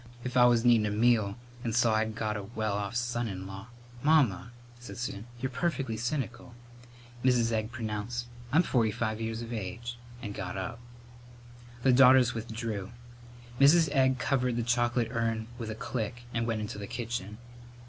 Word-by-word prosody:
If 125 0 -4
I 125 -1 +7
was 120 -1 +4
needin' 115 -3 +5
a - - 0
meal 110 -1 +2 0.3
and 115 -2 -1
saw 120 -2 +4
I'd 110 0 0
got 110 -2 -2
a 105 - -3
well 110 0 -2
off 100 +3 -3
son 120 0 -1
in 95 -2 -5
law 95 +2 -8 0.2
" 120 0 -18
"Mamma," 135 - +3 0.3
said 125 - -9
Susan, 115 -2 -5
"you're 130 +1 -2
perfectly 135 -4 -1
cynical." 120 +1 -3 0.7
Mrs. 120 -3 +3
Egg 110 0 -1
pronounced, 115 0 -3 0.3
"I'm 160 +6 +5
forty 120 -8 +2
five 110 +1 -2
years 115 +1 -3
of 115 +1 -6
age," 120 +3 -5 0.2
and 105 -4 -6
got 95 -1 -5
up. 115 +5 -4 1.0
The 130 - +5
daughters 130 -1 +7
withdrew. 110 -3 -4 0.7
Mrs. 155 +3 +6
Egg 130 -2 +3
covered 125 -1 0
the 120 - 0
chocolate 120 0 +1
urn 115 -2 -1
with 115 -2 -4
a 110 - -4
click 120 +1 -4
and 115 0 0
went 110 -2 -1
into 105 -1 -5
the 100 - -6
kitchen. 115 -3 -4
115 Hz, 175 wpm, -30 LUFS, 110-125 Hz, 1.0 s, I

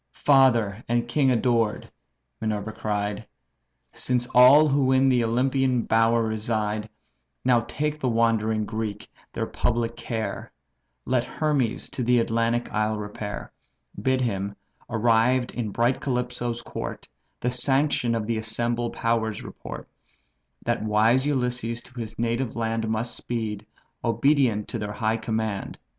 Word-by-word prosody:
"Father 120 -7 +4
and 120 0 +1
king 135 +3 +2
adored!" 115 -3 +1 0.5
Minerva 110 -1 -2
cried, 105 0 -3 0.6
"Since 125 -1 0
all 130 +5 +8
who 135 -2 +2
in 130 0 +4
the 125 -2 +3
Olympian 125 +1 +1
bower 115 +1 +3
reside 110 -1 -2 0.6
Now 120 -3 +4 0.2
make 150 0 0
the 130 - 0
wandering 110 -2 +1
Greek 105 -1 -5 0.2
their - - -2
public 115 0 -1
care, 110 -5 -4 0.5
Let 125 -2 +1
Hermes 140 -4 -1
to 125 - -3
the 125 +1 +3
Atlantic 115 +1 0
isle 110 0 0
repair; 105 0 -6 0.5
Bid 130 +3 +1
him, 100 -4 -2 0.3
arrived 120 +2 +2
in 120 -4 -3
bright 120 +5 +1
Calypso's 125 -2 -2
court, - - -6 0.3
The 125 - 0
sanction 130 -1 +1
of 110 -2 -2
the 115 0 -1
assembled 120 +2 -1
powers 110 -2 -1
report: - - -8 0.8
That 120 0 0
wise 110 +5 +3
Ulysses 125 -4 -1
to 130 -1 -11
his 110 -2 -6
native 120 +1 -1
land 115 -1 -1
Must 110 +2 -2
speed, 110 -3 -4 0.4
obedient 115 -2 +2
to 115 - -3
their 105 -1 -4
high 110 +2 0
command. 110 -3 -3
115 Hz, 130 wpm, -25 LUFS, 110-125 Hz, 0.8 s, all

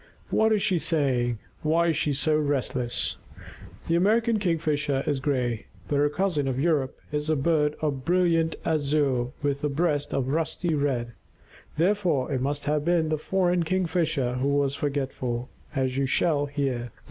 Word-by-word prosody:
What 220 0 +3
is 210 -2 +2
she 180 -3 +2
saying, 130 -8 +1 0.2
and 155 - 0
why 170 +1 +3
is 160 - +1
she 150 - 0
so 150 +3 +1
restless? 135 -5 0 0.7
The 165 - +1
American 220 +5 +3
Kingfisher 150 -6 0
is 145 -2 0
gray, 125 -5 -1 0.2
but 145 - 0
her 145 +1 +3
cousin 155 -4 0
of 130 -1 -1
Europe 145 -4 0
is 150 +1 -2
a 155 - +3
bird 150 0 +1
of 140 -4 -1
brilliant 165 0 +2
azure 145 -5 +1 0.2
with 140 0 -1
a 150 - +1
breast 145 -1 0
of 135 -1 -1
rusty 165 +3 -1
red. 130 -5 -1 0.6
Therefore 175 -6 +1
it 130 -2 0
must 145 +2 -1
have 150 0 +1
been 165 -1 +2
the 155 -1 0
foreign 180 +1 +1
Kingfisher 165 -7 0
who 130 +2 0
was 140 -1 +1
forgetful, 135 -4 -2 0.3
as 130 -2 0
you 135 - +1
shall 145 +1 +2
hear. 135 -4 -2
145 Hz, 165 wpm, -26 LUFS, 135-165 Hz, 0.7 s, What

